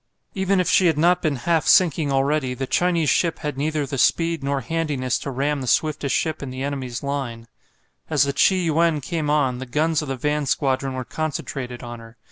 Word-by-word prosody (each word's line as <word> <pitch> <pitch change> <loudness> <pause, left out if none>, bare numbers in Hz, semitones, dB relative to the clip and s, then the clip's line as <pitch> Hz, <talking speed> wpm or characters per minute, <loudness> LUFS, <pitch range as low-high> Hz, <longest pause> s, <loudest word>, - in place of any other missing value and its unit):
Even 190 0 +1
if 180 - +1
she 185 - +4
had 160 -3 +2
not 175 +3 +3
been 155 -3 0
half 160 +5 0
sinking 160 -5 +4
already, 135 -1 +1
the 135 - -3
Chinese 170 +2 +1
ship 170 -2 +1
had 150 -2 -4
neither 150 +1 -1
the 135 0 -4
speed 165 0 +2
nor 140 0 -1
handiness 140 -2 -1
to - - -5
ram 140 +2 -1
the 130 - -5
swiftest 150 0 +1
ship 160 -1 -1
in 140 - -5
the 130 +1 -5
enemy's 130 -4 -4
line. 130 -5 -4 0.6
As 150 -3 +3
the 140 0 -1
"Chi 190 +6 +4
yuen" 165 -2 +2
came 150 +2 -3
on, 135 -4 +1
the 130 - -6
guns 155 +4 +1
of 150 - -6
the 135 -1 -3
van 150 +2 -1
squadron 135 -1 0
were 130 -1 -4
concentrated 135 -5 -4
on 120 -1 -7
her. 115 0 -14
145 Hz, 210 wpm, -22 LUFS, 130-160 Hz, 0.6 s, she